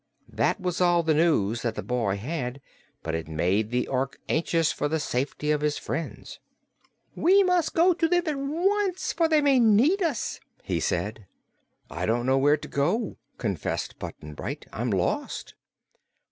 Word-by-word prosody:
That - - +1
was 180 -1 -2
all 175 -1 +4
the 160 -1 +2
news 120 -9 +2
that 115 -2 -2
the - - -4
boy 115 -6 -1
had, 125 +2 -4 0.4
but 80 - -3
it 80 -1 -3
made 90 +7 0
the 125 +1 0
Ork 135 0 -2
anxious 165 -1 +1
for - - -1
the 160 +2 -1
safety 145 +2 -1
of 150 -1 +1
his 150 0 0
friends. 165 - -5 0.7
"We 390 +4 +4
must 360 -3 +1
go 355 +2 +5
to 330 -1 +1
them 350 +1 +2
at 305 -3 -1
once, 365 +7 0
for 330 - +2
they 310 -2 +3
may 280 -3 +4
need 240 - +4
us," 310 - -1 0.2
he - - -1
said. 105 -1 -2 0.6
"I 90 +3 -4
don't 120 +2 +1
know 130 +1 +3
where 145 +2 +4
to - - -9
go," 180 +11 -1 0.2
confessed 100 - -3
Button 75 0 -8
Bright. - - -6
"I'm - - -2
lost." - - -2
155 Hz, 170 wpm, -26 LUFS, -, 0.7 s, go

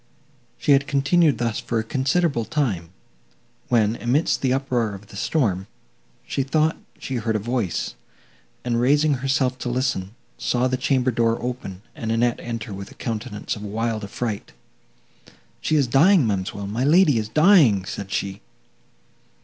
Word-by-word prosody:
She - - +1
had 140 0 +4
continued 145 +2 +3
thus 115 -2 -1
for 120 - -2
a 110 - 0
considerable 135 +2 0
time, 110 - -1 0.8
when, 115 -2 +2
amidst 130 +7 +1
the 130 - +1
uproar 125 -5 0
of 100 +1 -13
the - - -12
storm, 100 - 0 0.6
she - - -1
thought 155 +4 +1 0.2
she 130 - -4
heard 110 -1 -1
a 105 0 -2
voice, 120 - -1 0.7
and, 120 -1 +1
raising 145 +4 +3
herself 130 -1 0
to 125 - -3
listen, 120 -5 -2 0.2
saw 125 +1 +1
the 130 - 0
chamber 130 0 +1
door 115 0 +1
open, 120 -6 -5
and 110 -1 -4
Annette 120 +1 +1
enter 115 -3 -5
with 95 +1 -7
a - - -15
countenance 105 -2 -4
of 105 - -9
wild 110 +1 -2
affright. 105 +1 -4 1.1
"She 155 - +1
is 145 -3 +4
dying, 155 +6 +5
ma'amselle, 100 -1 -2
my 110 +5 -2
lady 150 -3 +5
is 110 0 -4
dying!" 150 - +5
said 100 0 -6
she. 100 +1 -3
120 Hz, 155 wpm, -23 LUFS, 105-135 Hz, 1.1 s, dying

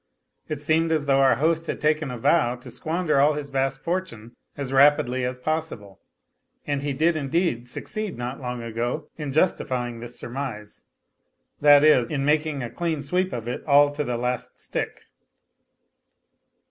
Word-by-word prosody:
It 155 -2 -3
seemed 160 +2 +1
as 155 -2 +1
though 135 -1 +3
our 135 -3 +5
host 165 +5 0
had - - -3
taken 155 -1 +1
a 125 - -5
vow 120 +1 +2
to 125 - -11
squander 160 -2 0
all 145 +2 +5
his 145 -1 -5
vast 135 0 -1
fortune 165 -11 -4 0.2
as 135 -2 -4
rapidly 135 -2 +4
as 125 0 -2
possible, 125 -9 -4 0.7
and 145 -1 -1
he 145 0 -2
did 160 +5 +2
indeed 140 -4 -1
succeed, 215 - -4
not 125 +3 -5
long 125 -2 -4
ago, 115 +1 -3
in 150 -3 -4
justifying 125 -6 0
this 120 +1 -7
surmise, 120 -5 -6 0.8
that 145 0 +7
is, 130 -6 +5
in 140 -2 -1
making 150 -2 +1
a 120 - -6
clean 165 -4 -2
sweep 180 +6 0
of 120 -1 -5
it 120 - -4
all 145 0 +5
to 145 +1 -3
the 125 -3 -2
last 125 0 -3
stick. - - -4
140 Hz, 165 wpm, -24 LUFS, 125-155 Hz, 0.8 s, that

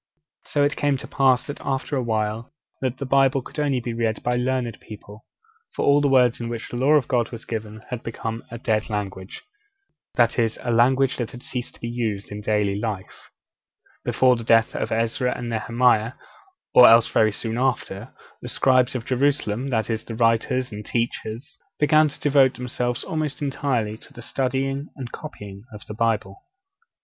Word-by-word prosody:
So 145 - +1
it 145 +1 +1
came 145 -2 +1
to - - -9
pass, 130 -2 +2
after 135 +2 -2
a 130 - +1
while, 110 +1 -2 0.3
that 130 -1 -1
the 140 - -4
Bible 135 0 +3
could 150 - -8
only 140 -3 +1
be 120 -1 -4
read 115 -1 -1
by 125 - +1
the 120 - 0
learned 125 -3 -1
people; 105 0 -12 0.5
for 145 +1 +3
the 145 - +3
words 125 -3 +3
in 115 - -3
which 115 -2 -5
the - - -6
Law 135 +5 +3
of 145 -5 +3
God 120 -3 +1
was 115 -1 -9
given 110 -1 -6
had 125 -2 -3
become 115 0 -5
a 120 - -7
'dead 110 -2 -1
language' 100 -3 -5 0.7
that 120 0 +3
is, 115 -1 +1
a 120 - -1
language 130 +3 +3
that 120 -3 -3
had 125 +1 -11
ceased 125 -1 -5
to - - -19
be 115 - -3
used 110 -5 -3
in 105 0 -6
daily 105 -1 0
life 105 -4 -2
at - - -15
all. - - -27
Before 130 -1 +3
the 115 - -6
death 115 0 +3
of - - -2
Ezra 115 +3 0
and 120 - -5
Nehemiah, 115 0 +2 0.6
or 125 - +9
else 115 0 +6
very 110 -1 +3
soon 115 +3 -4
after, 125 -4 -2 0.3
the - - -6
scribes 130 -1 +3
of 115 -3 -3
Jerusalem 130 -3 0
that 110 -5 0
is, 110 -1 -2
the 115 - -7
writers 115 +2 +1
and 105 0 -7
teachers 115 +5 -4 0.2
began 155 +1 +4
to 140 - -8
devote 140 -3 +4
themselves 125 -1 -2
almost 155 -3 -3
entirely 130 -7 -1
to - - -16
the 120 - -10
studying 135 +3 -2
and 125 -4 -7
copying 105 -10 -9
of 105 -1 -11
the - - -7
Bible. 115 - -1
120 Hz, 190 wpm, -23 LUFS, 110-130 Hz, 0.7 s, or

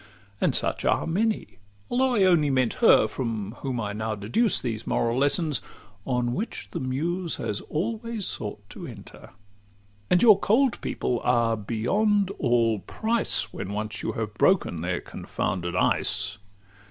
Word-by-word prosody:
And - - +2
such - - 0
are - - +2
many 205 - -1 0.3
though 255 0 +1
I 205 - +4
only 170 -6 +4
meant 130 -3 +2
her 110 - +6
From 110 -4 -3
whom 130 -3 -3
I 105 -2 -3
now 110 +1 -2
deduce 120 - +2
these 115 -3 -4
moral 115 +2 +1
lessons, 145 +1 +2 0.5
On 125 -2 0
which 215 - -4
the - - -3
Muse 165 +7 -2
has 105 - -3
always 220 +5 -3
sought 105 -2 -5
to - - -8
enter. - - -11 0.8
And 180 - +4
your 215 -4 +8
cold 245 +6 +2
people 120 - -1
are 120 -2 +2
beyond 190 - +1
all 115 -4 +2
price, 220 - -1
When 100 - -5
once 105 0 -3
you - - -2
have 110 -2 -4
broken 105 - +2
their 90 +1 -2
confounded 90 -1 -4
ice. 100 +2 0
125 Hz, 150 wpm, -26 LUFS, -, 0.8 s, your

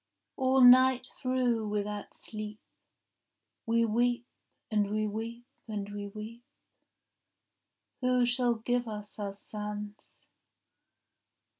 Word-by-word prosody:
— - - -55
All 265 0 +3
night 255 0 +7
through 250 -4 +1
without 210 0 -3
sleep 215 -1 -7 1.1
We 230 0 +3
weep, 240 +2 +1 0.5
and 210 -2 +2
we 215 +1 0
weep, 225 +3 -5 0.2
and 205 -2 -4
we 205 0 -4
weep. 215 +3 -9 1.6
Who 250 -1 +3
shall 245 0 +2
give 245 +2 -1
us 210 -1 -7
our 200 -1 -3
sons? 210 0 -6
225 Hz, 105 wpm, -30 LUFS, 210-245 Hz, 1.6 s, night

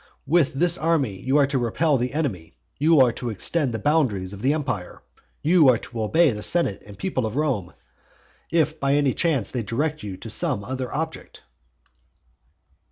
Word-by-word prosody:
With 155 -2 +2
this 175 +4 +2
army 145 - 0
you 135 +3 +1
are 145 - +5
to 135 -1 -1
repel 140 +6 +1
the 125 +3 -3
enemy, 100 - -3 0.2
you 155 +1 +4
are 125 -2 +5
to 120 +1 -5
extend 135 - -1
the 115 - -3
boundaries 110 -9 0
of 100 - -9
the 135 - +2
empire, 130 - -4 0.4
you 160 -3 +5
are 125 - +4
to 115 +1 -7
obey 160 +8 +3
the 105 -2 -5
senate 165 - 0
and 100 - -11
people 130 -12 -2
of 110 - -6
Rome, 125 - -1 0.8
if 160 -1 +1
by 140 0 +1
any 145 -3 +2
chance 145 - 0
they 125 - -2
direct 145 +9 -2
you 100 -3 -6
to 115 - -9
some 100 - 0
other 130 +2 -4
object. 160 +1 -5
135 Hz, 180 wpm, -23 LUFS, 110-155 Hz, 0.8 s, are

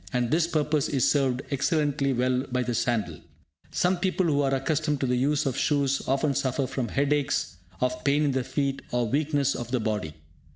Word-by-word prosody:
And 125 -1 0
this 165 +1 +3
purpose 150 -3 0
is 135 -4 +2
served 135 -3 +1
excellently 145 -1 +1
well 125 0 +1
by 125 0 +1
the 120 - -2
sandal. 110 -9 -1 0.5
Some 180 +1 +1
people 185 +1 0
who 145 -3 +2
are 135 -1 +1
accustomed 150 +2 0
to - - +1
the 125 -1 +1
use 145 +4 +1
of 135 -3 -1
shoes 140 -2 +1
often 140 +2 +1
suffer 135 0 0
from 130 -1 -3
headaches, 140 -8 0 0.2
of 125 0 -1
pain 145 +2 +2
in 145 - +2
the 130 -1 0
feet, 140 +1 -2
or 120 -1 0
weakness 140 +1 +1
of 120 -1 -5
the 125 0 0
body. 105 -9 -2
140 Hz, 195 wpm, -26 LUFS, 125-145 Hz, 0.5 s, this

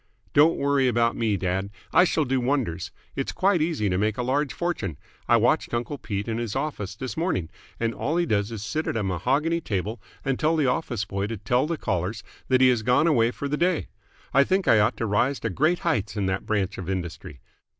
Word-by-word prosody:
"Don't 155 +3 +5
worry 140 -2 +2
about 120 -1 +2
me, 110 -3 0
dad. 95 +2 -1 0.2
I 180 - +7
shall 155 -3 +1
do 130 0 +1
wonders. 120 - -1 0.3
It's 135 - -2
quite 190 -3 +2
easy 155 -10 0
to 90 -1 0
make 105 +1 0
a 125 - -1
large 135 +3 0
fortune. 170 - -3 0.3
I - - +5
watched - - +2
uncle 120 +4 -3
Pete 100 0 -4
in 115 0 -2
his 115 -2 -3
office 135 -9 -3
this 125 +1 -5
morning, 95 - -1 0.3
and 115 0 0
all 155 +8 -1
he 175 - +2
does 105 -5 0
is 110 -3 -5
sit 155 +10 -2
at - - -1
a 110 - -1
mahogany 135 - 0
table 105 - -3 0.2
and 135 -2 0
tell 155 +2 +2
the 155 -3 +2
office 125 -5 -1
boy 100 +1 -2
to 115 0 -4
tell 125 +7 +1
callers 95 - -2 0.2
that 130 0 +3
he 130 - +7
has 120 -3 +2
gone 125 +6 +3
away 120 -8 +4
for 140 +3 -4
the 150 +1 -1
day. 175 +1 +1 0.4
I 140 - +6
think 190 +6 0
I 110 - +6
ought 105 - +2
to - - -1
rise 120 +6 +1
to 115 - -2
great 155 - +2
heights 110 - 0
in 100 - 0
that 95 0 -2
branch 105 -2 -1
of 95 -1 -5
industry. 85 -6 -5
120 Hz, 225 wpm, -25 LUFS, 100-145 Hz, 0.4 s, I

